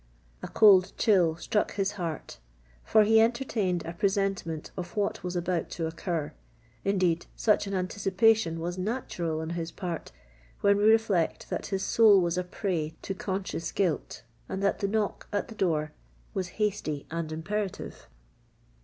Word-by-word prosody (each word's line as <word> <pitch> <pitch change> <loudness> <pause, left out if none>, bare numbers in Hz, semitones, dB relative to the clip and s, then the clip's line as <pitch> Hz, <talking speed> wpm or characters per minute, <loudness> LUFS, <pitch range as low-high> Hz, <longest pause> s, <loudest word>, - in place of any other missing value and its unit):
A - - -5
cold 195 -4 +6
chill 180 -8 +3
struck 210 +5 0
to - - -10
his 195 0 0
heart—for - - -2
he 220 +1 +5
entertained 225 -7 0
a 165 - -5
presentiment 195 -4 -1
of 180 +2 -7
what 205 -1 -1
was 180 0 -4
about 175 -1 -1
to 165 - -1
occur: 160 -2 -3 0.5
indeed, 185 -4 +1
such 210 -2 +2
an 195 - -2
anticipation 190 -1 +2
was 175 +2 -4
natural 180 -7 -2
on 160 +1 -4
his 170 -1 -4
part 170 0 -5 0.5
when 200 0 +4
we 205 - +2
reflect 215 -6 +2
that - - -3
his 195 -1 -2
soul 210 -1 +6
was 170 -1 +1
a 180 - 0
prey 175 -4 -3
to 195 - -3
conscious 190 -3 -3
guilt, 175 -10 -1 0.3
and 190 - -3
that 200 - +1
the 200 - 0
knock 210 0 -1
at 205 -1 -2
the 225 - -9
door 155 -6 0 0.4
was 190 -4 -2
hasty 195 -9 -1
and 165 -1 -3
imperative. 195 +5 -4
185 Hz, 155 wpm, -28 LUFS, 165-205 Hz, 0.5 s, cold